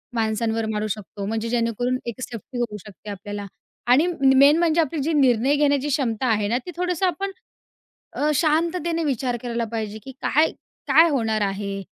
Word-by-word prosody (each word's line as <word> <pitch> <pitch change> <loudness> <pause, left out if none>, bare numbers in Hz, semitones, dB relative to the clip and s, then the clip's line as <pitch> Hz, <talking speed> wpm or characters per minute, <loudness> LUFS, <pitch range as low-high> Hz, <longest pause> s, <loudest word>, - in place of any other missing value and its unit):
माणसांवर 225 0 0
मारू 215 0 -2
शकतो. 205 -1 -5
म्हणजे 225 +2 -2
जेणेकरून 240 +1 0
एक 235 +1 -6
सेफ्टी 245 0 -6
करू 230 -3 -2
शकते 210 0 -12
आपल्याला. 205 +1 -6 0.4
आणि 270 +8 +5
म 275 -7 +3
मेन 285 +3 +7
म्हणजे 335 -1 +3
आपली 315 0 -2
जी 320 +4 0
निर्णय 265 -1 +3
घेण्याची 285 -1 +2
क्षमता 260 -5 0
आहे 210 -3 +1
ना, 235 +4 +1
ती 360 - -6
थोडंसं 360 0 0
आपण 390 +3 -2 0.8
अ, 300 +1 +1
शांततेने 330 +2 +1
विचार 255 -4 -1
करायला 235 -1 -2
पाहिजे, 215 -2 -3
की 265 - -8
काय, 310 +3 +3 0.4
काय 320 +5 +6
होणार 225 -7 0
आहे. 200 0 -2
245 Hz, 170 wpm, -23 LUFS, 220-300 Hz, 0.8 s, मेन